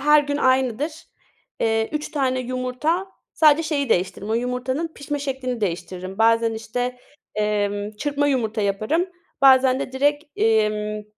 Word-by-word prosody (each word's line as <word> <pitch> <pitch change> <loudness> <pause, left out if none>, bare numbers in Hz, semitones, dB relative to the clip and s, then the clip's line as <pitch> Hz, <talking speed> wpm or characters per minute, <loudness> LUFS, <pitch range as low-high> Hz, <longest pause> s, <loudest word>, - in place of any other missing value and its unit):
her 300 +1 +6
gün 285 0 -2
aynıdır. 260 +2 +1 0.7
Eee, 225 0 +1
3 300 0 -3
tane 260 -3 0
yumurta, 255 +8 -1 0.3
sadece 310 0 +5
şeyi 290 -4 -1
değiştiririm, 195 +1 0
o - - +2
yumurtanın 250 +6 -1
pişme 290 +1 -4
şeklini 265 -4 -3
değiştiririm. 185 0 -4
Bazen 230 0 +3
işte, 245 +3 -3 0.4
emm, 205 -1 -1
çırpma 290 +2 0
yumurta 225 -5 0
yaparım, 215 - 0 0.4
bazen 260 -1 +6
de 260 - -4
direkt, 290 +3 +1
emm, 215 -1 +1
255 Hz, 135 wpm, -22 LUFS, 220-285 Hz, 0.7 s, her